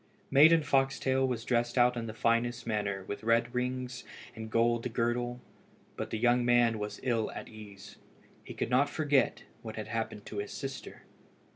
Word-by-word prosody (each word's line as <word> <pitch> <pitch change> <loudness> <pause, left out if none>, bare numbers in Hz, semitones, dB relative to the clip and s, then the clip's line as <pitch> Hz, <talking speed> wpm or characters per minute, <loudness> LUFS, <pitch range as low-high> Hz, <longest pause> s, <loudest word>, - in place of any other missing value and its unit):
Maiden 160 +3 +7
Foxtail 135 -1 +1
was 120 -3 -3
dressed 120 0 0
out 125 0 +4
in 115 -1 -4
the 110 - -6
finest 120 +1 0
manner 100 -3 -2
with 100 +2 -6
red 115 +2 +2
rings 125 0 -3 0.3
and 110 -1 -6
a - - -8
gold 115 +2 +1
girdle, 120 +1 -1 0.6
but - - -4
the - - -2
young 120 +2 +3
man 120 -2 +3
was 105 0 -5
ill 115 -4 0
at - - -7
ease, 105 -3 -12 0.5
and - - -9
could - - -2
not 140 +3 +3
forget 145 -4 +1 0.2
what 110 -2 -7
had 110 - -6
happened 115 -3 -4
to 105 - -8
his 100 - -5
sister. 135 0 -7
120 Hz, 175 wpm, -30 LUFS, 110-125 Hz, 0.6 s, Maiden